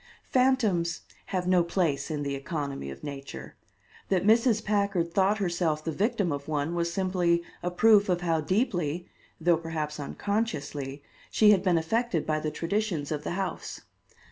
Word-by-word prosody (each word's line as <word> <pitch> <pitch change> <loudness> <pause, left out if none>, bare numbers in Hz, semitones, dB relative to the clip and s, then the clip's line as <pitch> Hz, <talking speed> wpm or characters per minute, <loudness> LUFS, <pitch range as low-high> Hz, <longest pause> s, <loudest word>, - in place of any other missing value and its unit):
Phantoms 225 -10 +2 0.3
have 180 -1 -2
no 180 -1 +4
place 165 -5 0
in 150 -2 -2
the 140 -1 -2
economy 140 - -4
of 70 0 -9
nature. 140 -1 -7 0.5
That 190 -2 +2
Mrs. 225 0 +4
Packard 200 -5 0
thought 195 +3 +3
herself 175 -5 0
the 160 - -2
victim 200 0 0
of 140 -1 -4
one 155 +1 -1
was 170 0 0
simply 175 -2 +1 0.2
a 180 - -1
proof 205 +2 +5
of 175 -1 +1
how 165 -2 +1
deeply, 175 - 0 0.3
though 170 0 +3
perhaps 155 -2 -4
unconsciously, 145 - -3 0.3
she 210 -1 +5
had 195 -3 +4
been 180 -3 +2
affected 185 +1 0
by 155 0 0
the 155 - -2
traditions 170 -1 -2
of 150 -1 -2
the 150 - -3
house. 190 +1 -4
175 Hz, 160 wpm, -28 LUFS, 155-200 Hz, 0.5 s, proof